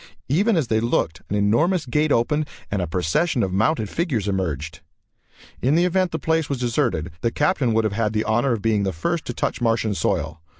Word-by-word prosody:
Even 195 - +3
as 155 - +1
they 110 -1 +1
looked 110 -8 0
an 105 - -1
enormous 150 - +2
gate 150 +4 +1
opened 150 +6 +1 0.2
and 100 -2 0
a 90 - -2
procession 95 - 0
of 95 -1 -2
mounted 110 +3 +1
figures 130 - -1
emerged. 80 -6 -2 0.8
In 135 +5 +2
the 170 +2 +4
event 185 0 +1
the 160 - -3
place 160 0 0
was 140 - -1
deserted, 120 - -1
the 115 - +1
Captain 145 -1 +1
would 115 - +3
have 110 -2 -1
had 110 0 0
the 110 0 0
honor 120 +4 +1
of 110 - -4
being 110 -2 +2
the 95 -1 -1
first 165 - -2
to 120 - -4
touch - - -2
Martian 115 -2 +1
soil. 80 -5 -1
115 Hz, 210 wpm, -22 LUFS, 100-155 Hz, 0.8 s, the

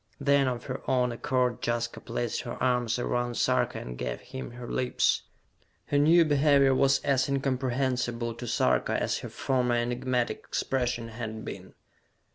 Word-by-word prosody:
Then, 140 -1 +3
of 125 -2 -2
her 130 0 -5
own 125 -2 +2
accord, 125 0 0
Jaska 120 0 -1
placed 120 -2 -3
her 120 - -6
arms 125 -2 +1
around 120 -1 -1
Sarka, - - +1
and 60 0 -7
gave - - -3
him 130 +1 -7
her 120 0 -8
lips. 125 +1 +1 0.7
Her 145 - +3
new 165 +3 +6
behavior 140 -2 +4
was 135 +1 +4
as 135 -1 +2
incomprehensible 130 -3 -1
to 120 +1 -7
Sarka 115 - +1
as - - -1
her - - -7
former 125 -2 0
enigmatic 125 +1 -1
expression 125 -3 -2
had 110 -1 -6
been. - - -8
125 Hz, 150 wpm, -28 LUFS, 120-135 Hz, 0.7 s, new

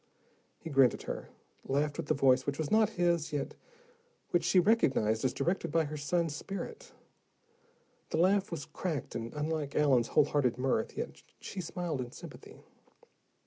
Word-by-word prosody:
He 165 - -8
grinned 135 -4 +5
at - - -10
her, - - -5 0.3
laughed 145 +2 0
with - - -4
the - - +2
voice 130 -1 +3
which 140 0 -1
was 155 -2 -3
not 220 -1 +5
his, 170 -3 +1
yet 145 -2 -2 0.8
which 175 - +2
she 185 - +4
recognized 135 - +3
as 130 - +2
directed 175 -3 -1
by 165 +1 +3
her 155 0 -5
son's 155 +1 0
spirit. 195 +3 -6 1.2
The - - -1
laugh 195 +4 +3
was 165 -4 -5
cracked 160 -8 -4
and 115 0 -4
unlike 150 -1 -2
Allen's 130 -6 +4
whole - - +4
hearted 125 -5 +1
mirth, 125 -3 0
yet - - -5 0.2
she 190 - -6
smiled 170 -4 -3
in 120 -1 -7
sympathy. - - -12
150 Hz, 165 wpm, -31 LUFS, 135-175 Hz, 1.2 s, grinned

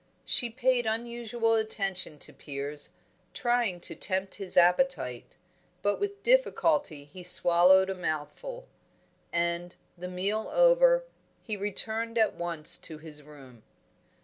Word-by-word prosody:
She 240 - +4
paid 250 0 0
unusual 235 0 -2
attention 195 -7 -1
to - - -15
Piers, 145 +1 -4 0.4
trying 240 -7 -1
to - - 0
tempt 190 0 -3
his 185 -2 0
appetite; 180 - +1 0.5
but 205 0 0
with 405 0 -4
difficulty 300 - +1
he 165 +6 -13
swallowed 180 +2 +6
a 195 - -3
mouthful. 190 - -6 0.6
And, 170 +1 -2 0.2
the 180 0 -8
meal 195 +4 -3
over, - - +4 0.4
he 215 - -4
returned 220 +3 -2
at 220 -1 +2
once 170 -3 +3
to 160 -2 -10
his 150 -1 -11
room. 135 -5 -16
195 Hz, 120 wpm, -28 LUFS, 170-240 Hz, 0.6 s, swallowed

